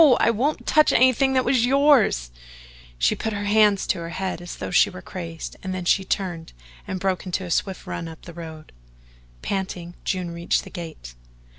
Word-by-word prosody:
I -, -, +4 dB
wouldn't 265 Hz, +8 st, -1 dB
TOUCH 305 Hz, -1 st, +4 dB
anything 260 Hz, +2 st, +4 dB
that 255 Hz, -1 st, +2 dB
was 250 Hz, -1 st, +3 dB
yours" 260 Hz, -, +4 dB, 0.7 s
she -, -, +3 dB
put 220 Hz, -, -3 dB
her 205 Hz, 0 st, -3 dB
hands 210 Hz, -1 st, +4 dB
to -, -, 0 dB
her 165 Hz, 0 st, -5 dB
head 185 Hz, 0 st, -3 dB
as 175 Hz, -, -7 dB
though -, -, -6 dB
she 195 Hz, +3 st, +5 dB
were 185 Hz, -2 st, -10 dB
crazed, 165 Hz, -4 st, -7 dB
and 185 Hz, 0 st, -4 dB
then 185 Hz, -1 st, -4 dB
she 190 Hz, +2 st, +3 dB
turned 180 Hz, -4 st, -3 dB, 0.3 s
and 190 Hz, -, -3 dB
broke 190 Hz, 0 st, -1 dB
into 185 Hz, +1 st, -2 dB
a 175 Hz, -, -6 dB
swift 190 Hz, +2 st, -1 dB
run 165 Hz, -, -5 dB
up 160 Hz, -1 st, -11 dB
the 170 Hz, -, -10 dB
road. 160 Hz, -2 st, -9 dB, 0.7 s
Panting, 185 Hz, -3 st, -3 dB
June 180 Hz, -2 st, -2 dB
reached 170 Hz, 0 st, 0 dB
the -, -, -12 dB
gate. 160 Hz, -, -8 dB
185 Hz, 190 wpm, -23 LUFS, 170-215 Hz, 0.7 s, she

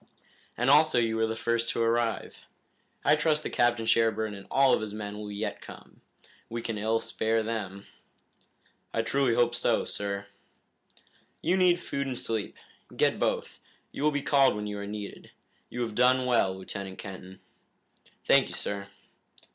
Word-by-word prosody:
"And 125 Hz, +3 st, +3 dB
also 155 Hz, -2 st, +5 dB
you 115 Hz, -1 st, +2 dB
were 110 Hz, 0 st, +1 dB
the 110 Hz, -, -3 dB
first 115 Hz, +1 st, 0 dB
to 115 Hz, -, 0 dB
arrive. 115 Hz, -1 st, -1 dB, 0.6 s
I 150 Hz, -, +6 dB
trust 155 Hz, 0 st, +1 dB
that -, -, -4 dB
Captain 120 Hz, -1 st, +2 dB
Sherburne 110 Hz, -1 st, +2 dB
and 100 Hz, -1 st, -10 dB
all 135 Hz, -1 st, +4 dB
of -, -, +2 dB
his 105 Hz, -1 st, -5 dB
men 105 Hz, -1 st, -5 dB
will 105 Hz, -1 st, -6 dB
yet 105 Hz, +2 st, -4 dB
come. -, -, -13 dB, 0.5 s
We 115 Hz, 0 st, -4 dB
can 110 Hz, -2 st, -3 dB
ill 110 Hz, +2 st, +1 dB
spare 110 Hz, 0 st, 0 dB
them." 100 Hz, -3 st, -4 dB, 1.1 s
"I 115 Hz, -, +1 dB
truly 125 Hz, +1 st, +1 dB
hope 120 Hz, 0 st, +3 dB
so, -, -, +1 dB
sir." 100 Hz, 0 st, -4 dB, 1.2 s
"You 175 Hz, -, +2 dB
need 180 Hz, -2 st, +4 dB
food 140 Hz, -5 st, -3 dB
and 130 Hz, -2 st, -3 dB
sleep. 110 Hz, -3 st, -2 dB, 0.4 s
Get -, -, +2 dB
both. -, -, -1 dB, 0.3 s
You -, -, -7 dB
will 150 Hz, -, +4 dB
be 145 Hz, -2 st, -2 dB
called 135 Hz, -5 st, +4 dB
when 105 Hz, 0 st, -4 dB
you 105 Hz, -1 st, -4 dB
are 100 Hz, -, -5 dB
needed. 105 Hz, -1 st, -7 dB, 0.4 s
You 125 Hz, -, -5 dB
have 115 Hz, -2 st, -4 dB
done 125 Hz, +2 st, +4 dB
well, 105 Hz, -7 st, +2 dB
Lieutenant 95 Hz, 0 st, -6 dB
Kenton." 95 Hz, -1 st, -9 dB, 0.9 s
"Thank -, -, +5 dB
you, -, -, -6 dB
sir." 100 Hz, -1 st, -3 dB
115 Hz, 170 wpm, -28 LUFS, 105-125 Hz, 1.2 s, I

